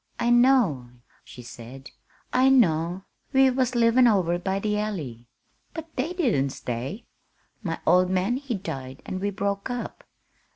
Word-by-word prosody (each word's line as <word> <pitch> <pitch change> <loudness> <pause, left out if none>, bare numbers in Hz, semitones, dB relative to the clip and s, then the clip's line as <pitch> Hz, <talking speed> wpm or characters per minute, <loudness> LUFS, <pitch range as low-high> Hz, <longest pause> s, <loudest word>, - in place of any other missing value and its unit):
"I 240 - +1
know," 240 - +3 0.3
she 125 - -12
said, 120 +3 -11 0.4
"I 260 +1 +4
know. 175 -7 +2 0.3
We 265 0 +5
was 255 -1 0
livin' 240 +1 +5
over 180 -6 +2
by 190 +2 -1
the 210 +1 -1
Alley. 145 - -5 0.5
But 325 0 -8
they 280 +6 -1
didn't 230 - +1
stay. 130 - -5 0.6
My 165 -6 -3
old 180 0 +4
man 190 +6 0
he 270 -4 -4
died 135 -9 -7
an' 185 - -4
we 200 +2 -1
broke 200 +2 -3
up. 245 -1 -5
200 Hz, 150 wpm, -25 LUFS, 160-245 Hz, 0.6 s, We